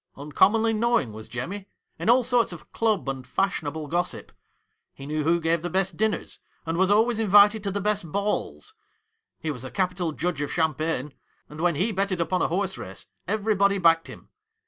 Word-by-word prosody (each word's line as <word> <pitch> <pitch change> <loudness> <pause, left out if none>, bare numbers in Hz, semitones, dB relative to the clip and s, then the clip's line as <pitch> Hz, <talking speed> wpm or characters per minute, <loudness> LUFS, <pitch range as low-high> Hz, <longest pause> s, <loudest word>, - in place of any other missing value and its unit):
Uncommonly 205 +11 +2
knowing 225 - +1
was 110 0 -9
Jemmy 185 +12 -5 0.3
in - - -1
all 250 +2 +6
sorts 245 -3 +2
of 175 - -11
club 220 -8 0
and 135 -2 -4
fashionable 160 -1 -2
gossip. 175 +4 -3 0.6
He 135 - -10
knew 150 +1 -2
who 170 +3 +2
gave 165 0 +1
the 175 - -3
best 190 0 0
dinners, 215 +3 -2 0.3
and 165 0 -2
was 190 +2 +2
always 220 +2 +3
invited 205 0 +5
to - - 0
the 200 +1 -2
best 205 -5 -1
balls. 210 - -2 0.6
He 160 - -3
was 125 -4 -7
a 130 - -6
capital 180 -1 -1
judge 160 -1 -2
of 145 - -3
champagne, 155 -3 -1 0.3
and 150 +1 -9
when 175 -2 +2
he 195 +10 0
betted 195 -2 -1
upon 170 +2 0
a - - +2
horse 190 +2 -2
race 95 - -8 0.2
everybody 200 -1 +2
backed 165 -3 +3
him. - - -12
180 Hz, 185 wpm, -25 LUFS, 155-205 Hz, 0.6 s, all